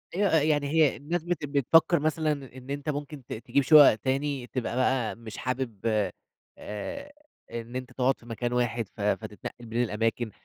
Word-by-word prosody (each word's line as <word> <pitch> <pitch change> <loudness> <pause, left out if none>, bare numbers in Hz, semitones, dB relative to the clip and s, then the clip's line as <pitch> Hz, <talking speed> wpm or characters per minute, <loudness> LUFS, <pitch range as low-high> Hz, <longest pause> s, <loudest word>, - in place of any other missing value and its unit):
أيوه، 200 +2 +3
آآ 160 -3 +4
يعني 145 -1 +2
هي 155 -1 +4
الناس 160 +4 -3
بت 175 -3 -2
بتفكر 150 +4 +4
مثلًا 155 0 +1 0.3
إن 130 +1 -12
أنت 145 +2 -3
ممكن 145 -1 -5
ت - - -6
تجيب 120 +5 0
شُقق 145 -3 +8
تاني، 135 +2 -2
تبقى 125 -2 -3
بقى 130 -2 +1
مش 115 -3 -10
حابب 125 -4 -3 0.8
آآ 280 - -6 0.4
إن 115 +1 -6
أنت 130 -1 -5
تقعد 130 +1 +1
في - - -18
مكان 120 +1 -3
واحد، 120 -2 0
ف - - -7
فتتنقل 120 - -3
بين 115 +2 0
الأماكن، 115 0 -1
130 Hz, 170 wpm, -27 LUFS, 120-150 Hz, 0.8 s, شُقق